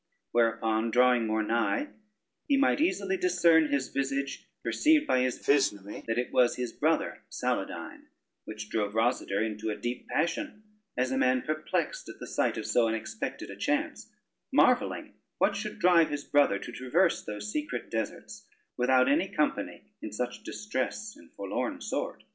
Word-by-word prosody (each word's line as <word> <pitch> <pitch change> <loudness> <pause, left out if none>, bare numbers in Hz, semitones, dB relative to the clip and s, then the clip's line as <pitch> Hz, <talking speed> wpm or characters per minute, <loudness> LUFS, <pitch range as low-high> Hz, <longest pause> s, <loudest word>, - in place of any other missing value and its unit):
Whereupon 115 -1 +1
drawing 125 -1 +4
more 110 0 +1
nigh, 115 - 0 0.6
he 280 - +3
might 275 +1 +3
easily 370 +2 +1
discern 170 - +4
his 140 -2 -1
visage, 135 0 -2 0.2
perceived 305 0 +3
by 130 - +2
his 130 0 0
physnomy 105 -8 +1
that 115 0 -1
it 125 - -1
was 125 -1 +4
his 125 -2 -4
brother - - 0
Saladyne, - - -3 0.4
which 105 -1 -7
drave 105 -2 -1
Rosader 110 -3 +1
into 110 0 -4
a 105 - -1
deep 120 +1 -4
passion, 210 - -2 0.3
as 125 +1 +1
a 130 - 0
man 130 0 +2
perplexed 155 - -2
at - - -9
the - - -6
sight - - 0
of - - -4
so 120 -2 +3
unexpected 110 0 -4
a - - -8
chance, - - -2 0.4
marvelling - - +2 0.2
what 200 - +2
should 210 +1 -4
drive 175 -3 +5
his 145 -1 -3
brother 145 -8 +3
to - - -8
traverse 165 +8 +1
those 105 0 -5
secret 150 -4 -4
deserts, 110 -2 -5 0.3
without 130 +1 +4
any 155 +7 +3
company, 150 -5 -1 0.2
in - - -6
such 125 +3 -4
distress 210 0 -4
and - - -18
forlorn - - -3
sort. - - -4
130 Hz, 160 wpm, -29 LUFS, 115-165 Hz, 0.6 s, drive